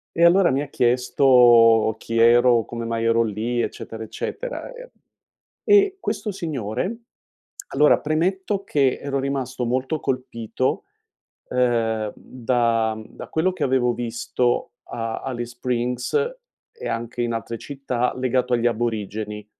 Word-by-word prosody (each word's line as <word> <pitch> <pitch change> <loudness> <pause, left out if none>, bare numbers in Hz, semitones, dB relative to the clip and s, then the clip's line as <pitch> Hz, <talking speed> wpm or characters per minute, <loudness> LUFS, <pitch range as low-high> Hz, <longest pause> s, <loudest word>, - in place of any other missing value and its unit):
e 170 - +4
allora 180 +2 +5
mi 135 +2 0
ha 145 - -7
chiesto: 120 -3 +4
"Chi 115 0 -3
ero? 120 0 +5
Come 115 +1 -6
mai 115 0 -2
ero 115 0 +3
lì?" 115 +3 -2
Eccetera, 115 -1 -5
eccetera, - - -5
e - - -11 0.8
e 400 -1 +5
questo 215 - -3
signore 160 - -3 0.8
allora, 150 +2 +4
premetto 190 +6 -1
che 135 -3 +1
ero 140 -1 -2
rimasto 130 -2 -2
molto 130 +5 -1
colpito, 130 -1 -2 0.6
ehm, 115 -4 0
da 115 -3 0
mhmm, 110 0 -10
da - - -8
quello 170 +4 +1
che 180 -5 -2
avevo 125 -2 +2
visto 120 +1 -1
a 115 -1 -4
Alice 120 -3 -4
Springs 125 0 -2 0.6
e 460 - -7
anche 115 +1 -4
in 120 -1 -1
altre 115 0 -4
città 130 -3 -2
legato 125 -1 0
agli 120 0 +1
aborigeni 110 -2 -3
125 Hz, 130 wpm, -22 LUFS, 115-140 Hz, 0.8 s, allora